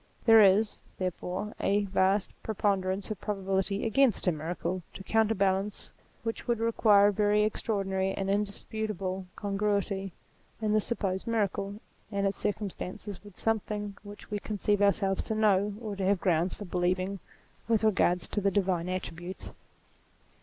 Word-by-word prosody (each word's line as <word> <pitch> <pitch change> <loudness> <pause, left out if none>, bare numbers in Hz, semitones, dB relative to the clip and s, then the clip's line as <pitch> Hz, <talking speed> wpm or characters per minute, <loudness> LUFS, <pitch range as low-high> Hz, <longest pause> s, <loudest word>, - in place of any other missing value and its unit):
There 225 -1 +8
is, 205 +2 +4 0.2
therefore, 185 +3 -3
a 205 +1 +2
vast 190 +1 +2
preponderance 195 -2 -1
of 215 - -5
probability 195 0 -1
against 240 +1 +3
a 180 - +4
miracle, 170 +3 -3
to 190 - -8
counterbalance 200 -2 +1 0.3
which 225 0 -4
would 240 -1 +2
require 215 -3 +5
a - - -1
very 210 +1 +3
extra 215 +1 -1
ordinary 190 -1 0
and 195 0 -3
indisputable 200 -2 -2
congruity 200 -1 -1 0.5
in 215 -1 0
the 215 - +4
supposed 195 -4 -2
miracle 200 -3 -1 0.4
and 200 -1 0
its 195 - 0
circumstances 205 -1 -4
with 205 -3 -14
something 210 -2 -1
which 205 +1 -12
we 205 - -1
conceive 205 0 0
ourselves 195 -1 +2
to 220 - -1
know, 205 -1 +3
or 215 -4 -5
to 195 - -3
have 195 0 +2
grounds 175 -1 +1
for 205 - -7
believing, 185 +2 0 0.5
with 225 -1 +2
regard 185 -4 +3
to 205 - -2
the 200 - +3
divine 185 -3 0
attributes. 180 0 -5
200 Hz, 145 wpm, -29 LUFS, 190-210 Hz, 0.5 s, There